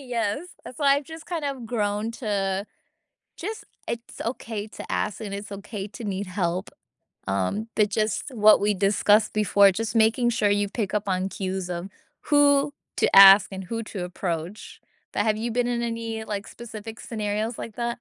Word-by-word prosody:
yes, 235 Hz, -4 st, -1 dB, 0.3 s
that's 255 Hz, -, -10 dB
why 280 Hz, -1 st, +4 dB
I've 285 Hz, -, -3 dB
just 320 Hz, +1 st, -10 dB
kinda 285 Hz, -7 st, -3 dB
grown 210 Hz, -1 st, -1 dB
to 195 Hz, -1 st, -1 dB, 0.7 s
just 430 Hz, +5 st, -5 dB, 0.2 s
it's 235 Hz, 0 st, -6 dB
okay 225 Hz, -3 st, -4 dB
to -, -, -10 dB
ask, 210 Hz, -, -1 dB
and 200 Hz, -2 st, -5 dB
it's 200 Hz, 0 st, -7 dB
okay 200 Hz, 0 st, -6 dB
to 225 Hz, +2 st, -9 dB
need 200 Hz, -1 st, -3 dB
help, 180 Hz, 0 st, -2 dB, 0.6 s
um, 100 Hz, -, -1 dB
but 210 Hz, -1 st, +3 dB
just 215 Hz, +6 st, -1 dB
what 215 Hz, -3 st, +6 dB
we 205 Hz, +1 st, +2 dB
discussed 205 Hz, +2 st, +3 dB
before, 200 Hz, -1 st, +5 dB
just 225 Hz, +2 st, -3 dB
making 225 Hz, +2 st, +4 dB
sure 215 Hz, -3 st, +2 dB
you 205 Hz, 0 st, +1 dB
pick 205 Hz, -2 st, -3 dB
up 205 Hz, -1 st, -1 dB
on 185 Hz, 0 st, 0 dB
cues 190 Hz, -2 st, -4 dB
of 175 Hz, +2 st, -4 dB, 0.4 s
who 285 Hz, 0 st, +5 dB, 0.2 s
to -, -, +2 dB
ask 195 Hz, +1 st, +10 dB
and 190 Hz, -1 st, -6 dB
who 230 Hz, +3 st, -4 dB
to 200 Hz, -4 st, -6 dB
approach. 175 Hz, +1 st, -5 dB, 0.3 s
But -, -, +1 dB
have 215 Hz, -1 st, +2 dB
you 230 Hz, +1 st, -2 dB
been 245 Hz, +1 st, +1 dB
in 240 Hz, -1 st, -1 dB
any, 230 Hz, -1 st, -3 dB
like, 205 Hz, -1 st, -5 dB
specific 225 Hz, -1 st, -9 dB
scenarios 215 Hz, +1 st, -3 dB
like 220 Hz, -, -7 dB
that? 235 Hz, -1 st, -2 dB
215 Hz, 175 wpm, -25 LUFS, 200-235 Hz, 0.7 s, ask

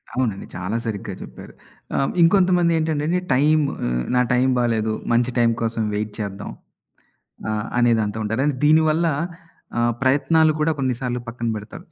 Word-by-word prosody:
అవునండి. 115 Hz, -6 st, -1 dB
చాలా 95 Hz, +4 st, -3 dB
సరిగ్గా 105 Hz, -3 st, -4 dB
చెప్పారు. -, -, -11 dB, 0.4 s
ఆహ్, 135 Hz, -, +1 dB
ఇంకొంతమందేంటంటేండి 170 Hz, -3 st, +3 dB
టైము 150 Hz, +2 st, +3 dB, 0.5 s
నా 125 Hz, -, +4 dB
టైం 125 Hz, +2 st, +3 dB
బాలేదు. 110 Hz, -2 st, 0 dB, 0.2 s
మంచి 120 Hz, +1 st, +2 dB
టైం 115 Hz, -1 st, +4 dB
కోసం 115 Hz, -1 st, -1 dB
వెయిట్ 105 Hz, 0 st, -3 dB
చేద్దాం. 100 Hz, -1 st, -5 dB, 1.0 s
ఆహ్, 105 Hz, 0 st, -2 dB
అనే 120 Hz, -1 st, +4 dB
దాంతో 105 Hz, 0 st, -2 dB
ఉంటారు. 115 Hz, +7 st, 0 dB, 0.2 s
దీని 155 Hz, +2 st, +6 dB
వల్ల 160 Hz, +2 st, +1 dB, 0.7 s
ఆహ్, 120 Hz, 0 st, +2 dB
ప్రయత్నాలు 155 Hz, +4 st, +3 dB
కూడా 160 Hz, +1 st, +2 dB
కొన్ని 130 Hz, -2 st, 0 dB
సార్లు 125 Hz, -2 st, -2 dB
పక్కన 115 Hz, 0 st, -4 dB
పెడతారు. 105 Hz, +1 st, -9 dB
125 Hz, 140 wpm, -22 LUFS, 110-155 Hz, 1.0 s, దీని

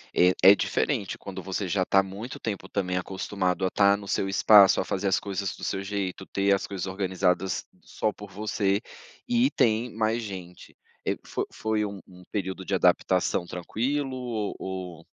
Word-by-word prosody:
É 90 Hz, +1 st, +5 dB, 0.2 s
é 100 Hz, -, +7 dB
diferente 110 Hz, -5 st, -1 dB
quando 95 Hz, -1 st, -7 dB
você 95 Hz, +2 st, -3 dB
já 95 Hz, +1 st, +1 dB
tá 95 Hz, +1 st, +4 dB
muito 100 Hz, +7 st, -7 dB
tempo, 100 Hz, -3 st, -4 dB
também, 90 Hz, -2 st, -1 dB
acostumado 95 Hz, 0 st, -1 dB
a -, -, +2 dB
estar 100 Hz, +1 st, +4 dB
no 100 Hz, -, -10 dB
seu 95 Hz, -, 0 dB
espaço, 100 Hz, 0 st, +7 dB
a -, -, 0 dB
fazer 100 Hz, +1 st, -1 dB
as 95 Hz, -, +3 dB
coisas 100 Hz, -2 st, -4 dB
do -, -, -12 dB
seu 95 Hz, -, -2 dB
jeito, 95 Hz, -2 st, -3 dB
ter 100 Hz, 0 st, +2 dB
as 100 Hz, -, -1 dB
coisas 95 Hz, -2 st, -4 dB
organizadas 95 Hz, -1 st, 0 dB, 0.2 s
só 110 Hz, -, -2 dB
por 105 Hz, -1 st, -11 dB
você 100 Hz, 0 st, 0 dB, 0.5 s
e 245 Hz, +2 st, +3 dB
tem 115 Hz, -, +1 dB
mais 110 Hz, +1 st, +1 dB
gente. 95 Hz, -5 st, -9 dB, 0.3 s
Eh, -, -, +1 dB
fo -, -, -2 dB
foi 110 Hz, -1 st, -1 dB
um 100 Hz, -1 st, -7 dB
um 90 Hz, -1 st, -15 dB
período 95 Hz, -2 st, -3 dB
de 95 Hz, -, -1 dB
adaptação 90 Hz, -1 st, +2 dB
tranquilo 130 Hz, +11 st, -2 dB
ou 115 Hz, -5 st, -3 dB
ou 90 Hz, -3 st, -6 dB
100 Hz, 180 wpm, -27 LUFS, 95-105 Hz, 0.5 s, é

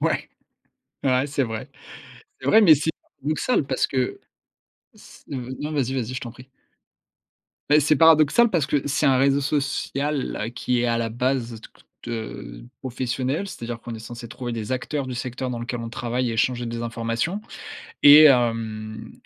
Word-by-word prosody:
Ouais! -, -, 0 dB, 0.8 s
Ouais, 130 Hz, +1 st, +2 dB
c'est 140 Hz, -1 st, 0 dB
vrai. 110 Hz, -2 st, -5 dB, 0.7 s
C'est -, -, -8 dB
vrai, 220 Hz, -, +6 dB
mais 175 Hz, -8 st, +8 dB
c'est 150 Hz, +3 st, -1 dB, 0.3 s
paradoxal 155 Hz, -, 0 dB
parce 130 Hz, -, 0 dB
que 130 Hz, -2 st, -2 dB, 0.7 s
c -, -, -17 dB
heu, 130 Hz, -1 st, -5 dB
non, 150 Hz, -, -4 dB
vas 145 Hz, -3 st, +1 dB
y, -, -, -3 dB
vas 135 Hz, -, 0 dB
y, 115 Hz, +3 st, -5 dB
je 130 Hz, -, -3 dB
t'en 120 Hz, -, -6 dB
prie. 125 Hz, +2 st, -15 dB, 1.2 s
Beh 150 Hz, -, +6 dB
c'est 150 Hz, +1 st, +3 dB
paradoxal 160 Hz, +9 st, +6 dB
parce 170 Hz, -8 st, +1 dB
que 145 Hz, -2 st, 0 dB
c'est 145 Hz, +1 st, +1 dB
un 135 Hz, -, +4 dB
réseau 140 Hz, +1 st, +3 dB
social 140 Hz, -3 st, -2 dB
qui 125 Hz, -1 st, 0 dB
est -, -, +1 dB
à 115 Hz, -1 st, +1 dB
la 115 Hz, -, -1 dB
base, 120 Hz, 0 st, -1 dB
heu, -, -, -9 dB
toute, -, -, -17 dB, 0.2 s
heu, -, -, -6 dB
professionnel, 130 Hz, +7 st, -3 dB
c'est 120 Hz, -, -8 dB
à -, -, -5 dB
dire 120 Hz, 0 st, -5 dB
qu'on 120 Hz, -, -8 dB
est 110 Hz, -, -7 dB
censé 120 Hz, +1 st, -9 dB
trouver 120 Hz, +1 st, -6 dB
des 115 Hz, +1 st, -5 dB
acteurs 130 Hz, +2 st, -2 dB
du 130 Hz, -, -4 dB
secteur 125 Hz, +1 st, -4 dB
dans 120 Hz, -, -4 dB
lequel 120 Hz, +1 st, -4 dB
on 115 Hz, -, -5 dB
travaille 120 Hz, +1 st, -2 dB
et 115 Hz, -, -3 dB
échanger 120 Hz, +2 st, 0 dB
des 115 Hz, 0 st, -4 dB
informations, 115 Hz, -, -2 dB, 0.6 s
et 145 Hz, +2 st, +10 dB
hem, 115 Hz, -5 st, +1 dB
125 Hz, 185 wpm, -23 LUFS, 115-145 Hz, 1.2 s, et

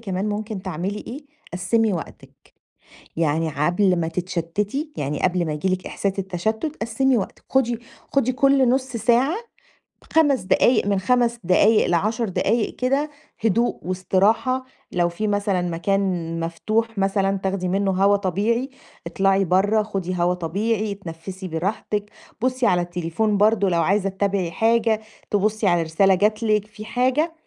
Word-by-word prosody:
كمان 195 Hz, -2 st, -2 dB
ممكن 210 Hz, -1 st, -4 dB
تعملي 190 Hz, +3 st, -3 dB
إيه؟ 285 Hz, +5 st, -8 dB, 0.3 s
قسّمي 205 Hz, +5 st, +1 dB
وقتِك. 170 Hz, -, -7 dB, 0.8 s
يعني 160 Hz, 0 st, +1 dB
ع 150 Hz, 0 st, -1 dB
قبل 180 Hz, +1 st, +2 dB
ما 160 Hz, -, -1 dB
تتشتتي، 185 Hz, -, -3 dB
يعني 145 Hz, 0 st, -3 dB
قبل 180 Hz, -2 st, +1 dB
ما 155 Hz, -, -2 dB
ييجي 150 Hz, +5 st, -2 dB
لِك 185 Hz, 0 st, -2 dB
إحساس 195 Hz, 0 st, -2 dB
التشتت 220 Hz, -, -2 dB
قسّمي 250 Hz, +3 st, +1 dB
وقتِك، 195 Hz, -, -6 dB
خدي 240 Hz, -3 st, +1 dB, 0.3 s
خدي 255 Hz, -2 st, +2 dB
كُل 275 Hz, -1 st, +3 dB
نُص 260 Hz, +1 st, +2 dB
ساعة، 240 Hz, -, +2 dB, 0.8 s
5 290 Hz, -5 st, +4 dB
دقايق 215 Hz, +4 st, +3 dB
من 200 Hz, -1 st, +1 dB
5 235 Hz, +3 st, +1 dB
دقايق 205 Hz, +5 st, +4 dB
ل10 215 Hz, +6 st, 0 dB
دقايق 210 Hz, +4 st, 0 dB
كده 275 Hz, +4 st, 0 dB, 0.3 s
هدوء 230 Hz, +3 st, +2 dB
واستراحة 200 Hz, +8 st, +1 dB, 0.3 s
لو 175 Hz, -1 st, +2 dB
في 210 Hz, +5 st, -3 dB
مثلًا 205 Hz, -3 st, 0 dB
مكان 175 Hz, +3 st, 0 dB, 0.4 s
مفتوح 215 Hz, +7 st, -2 dB
مثلًا 195 Hz, 0 st, +1 dB
تاخدي 190 Hz, -1 st, -2 dB
منه 195 Hz, +1 st, +1 dB
هوا 195 Hz, +2 st, +3 dB
طبيعي، 210 Hz, -, -1 dB, 0.4 s
اطلعي 195 Hz, +2 st, +2 dB
برّه 200 Hz, +5 st, +2 dB
خدي 195 Hz, -4 st, -3 dB
هوا 175 Hz, +1 st, +2 dB
طبيعي، 205 Hz, +5 st, -1 dB
اتنفسي 185 Hz, 0 st, -8 dB
براحتِك، 205 Hz, +5 st, -3 dB, 0.3 s
بُصّي 255 Hz, 0 st, +1 dB
على 175 Hz, -1 st, +3 dB
التليفون 175 Hz, +5 st, -1 dB
برضه 210 Hz, -1 st, +3 dB
لو 170 Hz, -2 st, +2 dB
عايزة 195 Hz, 0 st, +1 dB
تتابعي 195 Hz, -2 st, -1 dB
حاجة، 225 Hz, +3 st, +2 dB, 0.3 s
تبُصّي 210 Hz, +1 st, +1 dB
على 175 Hz, -2 st, +3 dB
رسالة 190 Hz, +4 st, +3 dB
جات 215 Hz, +4 st, +1 dB
لِك 215 Hz, -2 st, +1 dB
في 215 Hz, 0 st, -11 dB
حاجة، 260 Hz, +8 st, +1 dB
200 Hz, 145 wpm, -22 LUFS, 180-225 Hz, 0.8 s, 5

